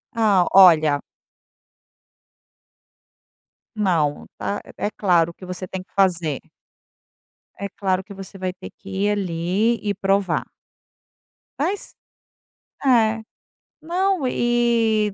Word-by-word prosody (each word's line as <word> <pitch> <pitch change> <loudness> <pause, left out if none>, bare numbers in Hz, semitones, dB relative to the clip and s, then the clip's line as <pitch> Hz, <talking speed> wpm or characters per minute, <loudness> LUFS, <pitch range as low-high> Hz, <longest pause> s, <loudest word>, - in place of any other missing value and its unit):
Ó, 205 -6 +3
olha 155 -6 +6 2.8
Não, 170 -9 0
tá. 205 - -3 0.2
É - - -1
é - - -5
claro 170 -4 +2
que 185 - -12
você 180 0 -6
tem 185 +1 -6
que - - -38
fazer. 175 -7 +1 1.2
É 200 - -5
claro 190 -1 -1
que 200 - -11
você 195 0 -10
vai 185 -1 -2
ter 180 - -10
que 195 - -13
ir 195 +2 0
ali 195 +4 0
e 205 -1 -1
provar. 195 0 0 1.1
Mas 370 +7 -2 0.9
é, 225 -4 +3 0.6
não 360 -2 0
e 235 -4 +1
195 Hz, 105 wpm, -22 LUFS, 180-225 Hz, 2.8 s, olha